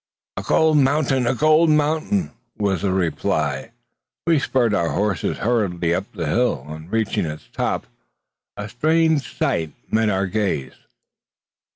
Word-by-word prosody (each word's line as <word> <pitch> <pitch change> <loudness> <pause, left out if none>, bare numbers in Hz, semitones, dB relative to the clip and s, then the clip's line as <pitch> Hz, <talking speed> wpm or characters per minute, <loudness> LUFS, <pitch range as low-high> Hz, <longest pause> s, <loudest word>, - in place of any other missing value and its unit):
"A - - -3
gold 160 -1 +3
mountain! 135 -2 +2
a 125 - +1
gold 155 +4 +4
mountain!" 155 +6 +1 0.3
was 100 -3 0
the 100 -1 0
reply. 80 -6 -1 0.6
We 165 -2 +3
spurred 125 -5 +1
our 85 -5 +1
horses 100 -3 -1
hurriedly 95 -7 0
up 95 +4 -3
the 90 -6 -4
hill. 95 - +1
On 80 +2 -9
reaching 110 -5 0
its 75 0 -7
top, - - -1 0.7
a 105 - -5
strange 155 +4 +1
sight 80 -3 0 0.2
met 110 0 +2
our 95 -1 +1
gaze. 95 -9 -2
105 Hz, 140 wpm, -21 LUFS, 85-145 Hz, 0.7 s, gold